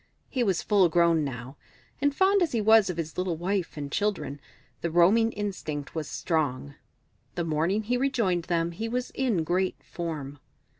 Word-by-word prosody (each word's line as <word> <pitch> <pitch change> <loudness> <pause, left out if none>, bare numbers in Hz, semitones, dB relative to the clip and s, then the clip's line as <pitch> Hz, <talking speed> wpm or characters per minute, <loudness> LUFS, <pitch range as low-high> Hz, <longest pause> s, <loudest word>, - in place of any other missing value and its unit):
He 255 - -1
was 190 -6 0
full 195 -4 +4
grown 170 -1 +3
now, 130 0 -6 0.4
and 285 0 +2
fond 390 +3 +4
as 335 -6 +1
he 230 - +1
was 220 -1 +5
of 180 - -3
his 165 0 -4
little 180 -3 -1
wife 180 0 -2
and 145 -1 -5
children, 185 -9 -2 0.4
the 170 - -1
roaming 195 +8 +4
instinct 160 -8 -4
was 160 -2 -3
strong. 145 -4 -1 0.6
The 175 - -1
morning 165 +7 0
he 245 +4 0
rejoined 230 -10 0
them 170 -1 0
he 225 +7 -4
was 250 +1 -2
in 235 -11 0
great 180 +3 0
form. 150 -5 -5
175 Hz, 170 wpm, -27 LUFS, 160-220 Hz, 0.6 s, was